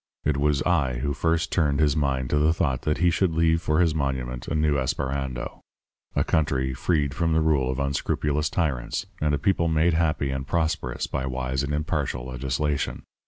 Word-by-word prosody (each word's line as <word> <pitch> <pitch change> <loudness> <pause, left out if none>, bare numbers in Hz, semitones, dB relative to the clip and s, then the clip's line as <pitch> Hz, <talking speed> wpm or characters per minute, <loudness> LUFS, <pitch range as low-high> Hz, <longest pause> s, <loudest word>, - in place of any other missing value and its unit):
It 75 - +2
was 70 -1 +1
I 75 -8 +2
who 70 +4 -1
first 80 +3 0
turned 75 -5 +2
his 75 -2 +3
mind 65 -4 0
to 75 - +3
the 80 +3 +3
thought 70 -7 0
that 75 +1 0
he 90 -1 +3
should 85 -1 +1
leave 80 0 +3
for 75 0 +1
his 85 -3 +3
monument 65 -4 -2
a - - -2
new 75 -1 +2
Esperando 65 -1 -3 0.5
a - - +3
country 70 -5 0
freed 70 +1 0
from 80 0 0
the 80 - +3
rule 75 -5 +2
of 65 - -2
unscrupulous 70 +2 0
tyrants, 70 -3 -1 0.2
and 75 -1 +2
a - - -1
people 85 +2 +1
made 80 +1 +3
happy 80 -4 +1
and 65 0 -4
prosperous 80 -6 -1
by 65 -1 -3
wise 65 0 -2
and 70 0 -3
impartial 75 -4 -2
legislation. 65 0 -2
75 Hz, 190 wpm, -25 LUFS, 65-80 Hz, 0.5 s, his